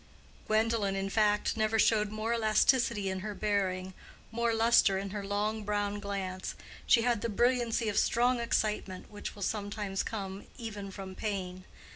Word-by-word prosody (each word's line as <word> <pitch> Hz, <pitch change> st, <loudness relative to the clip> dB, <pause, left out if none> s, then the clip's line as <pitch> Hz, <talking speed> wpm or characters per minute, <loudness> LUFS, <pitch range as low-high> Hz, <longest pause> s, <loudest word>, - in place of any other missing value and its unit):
Gwendolen, 215 Hz, -2 st, +1 dB
in 195 Hz, 0 st, -2 dB
fact, 210 Hz, 0 st, +2 dB
never 220 Hz, 0 st, +1 dB
showed 215 Hz, -1 st, +3 dB
more 215 Hz, +2 st, -2 dB
elasticity 220 Hz, -1 st, +3 dB
in 190 Hz, 0 st, -2 dB
her 205 Hz, +2 st, -5 dB
bearing, 190 Hz, -3 st, -1 dB, 0.4 s
more 235 Hz, 0 st, +1 dB
lustre 225 Hz, -3 st, +4 dB
in 195 Hz, 0 st, -4 dB
her 205 Hz, 0 st, -4 dB
long 210 Hz, +2 st, -1 dB
brown 205 Hz, 0 st, -1 dB
glance: 195 Hz, -2 st, -4 dB, 0.3 s
she 230 Hz, -, +5 dB
had 240 Hz, -3 st, +1 dB
the 230 Hz, -, -1 dB
brilliancy 240 Hz, 0 st, +1 dB
of 210 Hz, -, +2 dB
strong 245 Hz, +1 st, +2 dB
excitement, 210 Hz, -5 st, -1 dB
which 205 Hz, -, -6 dB
will 200 Hz, -, -6 dB
sometimes 205 Hz, -1 st, -2 dB
come 195 Hz, -3 st, -5 dB
even 210 Hz, -5 st, -6 dB
from 195 Hz, -1 st, -8 dB
pain. 185 Hz, -3 st, -4 dB
210 Hz, 155 wpm, -31 LUFS, 195-225 Hz, 0.4 s, she